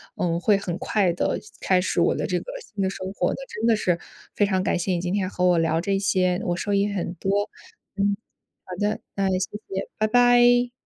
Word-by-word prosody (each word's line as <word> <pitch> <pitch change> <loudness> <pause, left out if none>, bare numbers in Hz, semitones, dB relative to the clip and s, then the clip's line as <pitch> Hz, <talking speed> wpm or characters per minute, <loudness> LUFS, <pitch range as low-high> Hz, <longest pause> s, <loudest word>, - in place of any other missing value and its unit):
嗯， 170 -1 0
会 200 +3 +3
很 180 -3 -4
快 190 -3 +1
地 175 - -1 0.2
开 185 -1 +3
始 185 - 0
我 - - +3
的 - - -2
这 - - 0
个 - - -13
新 210 - -5
的 190 - +1
生 190 0 -5
活 180 -3 0
的。 - - -6
真 220 - -4
的 230 - +5
是 180 -4 +1 0.4
非 205 - +3
常 190 -2 +1
感 195 - 0
谢 180 +2 -1
你 175 - +1
今 180 +1 -2
天 190 -2 0
和 180 -1 -1
我 175 -1 +4
聊 165 0 +2
这 195 +3 0
些， 185 -1 +1
我 175 -1 -1
受 205 +2 -2
益 200 +1 +2
很 180 -3 -3
多。 200 +3 -1 0.5
嗯， 200 0 +1 0.5
好 185 - -8
的， 205 +1 0
那 195 -1 +1
也 185 - +1
谢 185 - -2 0.2
谢， 195 0 -4
拜 215 0 +2
拜。 245 +1 +5
195 Hz, 250 characters per minute, -24 LUFS, 180-205 Hz, 0.5 s, 的